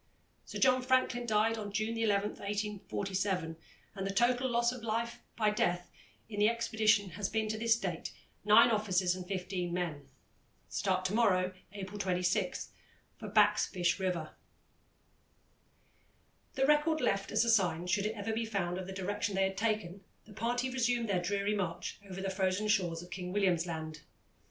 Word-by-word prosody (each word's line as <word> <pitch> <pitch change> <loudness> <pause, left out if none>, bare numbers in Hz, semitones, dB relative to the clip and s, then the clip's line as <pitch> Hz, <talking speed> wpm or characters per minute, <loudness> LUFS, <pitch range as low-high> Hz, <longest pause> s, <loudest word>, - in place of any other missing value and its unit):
Sir - - -6
John 255 -1 +4
Franklin 255 -1 +1
died 220 +1 +2
on 205 -1 -5
June 215 +3 -1
11, 210 -2 +1
1847, 200 -4 -2 0.4
and 195 -2 -4
the - - -1
total 245 +5 +2
loss 235 0 +2
of 250 -1 -7
life 230 +1 -2 0.2
by 215 -2 +3
death 175 -4 0 0.4
in 210 -2 -5
the 210 +1 +5
expedition 220 -4 +2
has 200 +2 -3
been 220 0 0
to 215 - -2
this 230 0 +4
date 180 -6 -4 0.3
nine 215 +3 +7
officers 190 -4 +1
and 180 -1 -7
fifteen 180 -2 -3
men. 165 -5 -3 0.6
Start 185 -2 0
to 185 - 0
morrow, 185 -5 +3 0.2
April 205 0 -7
26, 180 -1 0 0.5
for 215 - -7
Back's 210 0 +4
Fish 175 0 0
River." 180 -4 -2 2.2
The 270 -1 +2
record, 300 +2 +3
left 195 -8 0
as - - +3
a - - +1
sign, 180 -6 +2
should 200 +3 +1
it 220 - -4
ever 215 +1 -3
be 230 +1 -1
found, 190 -5 -2
of 185 - -6
the 190 - -6
direction 205 +2 -2
they 195 - +3
had 190 0 0
taken, 200 -3 -2 0.2
the 215 - -14
party 240 +4 -1
resumed 240 -2 0
their 185 -3 +1
dreary 200 +3 0
march 180 -5 -3
over 190 0 -6
the 195 0 -2
frozen 190 +2 0
shores 175 -5 +1
of 175 - -14
King 180 -1 -5
William's 180 -4 +1
Land. 160 -2 -5
205 Hz, 170 wpm, -32 LUFS, 185-225 Hz, 2.2 s, nine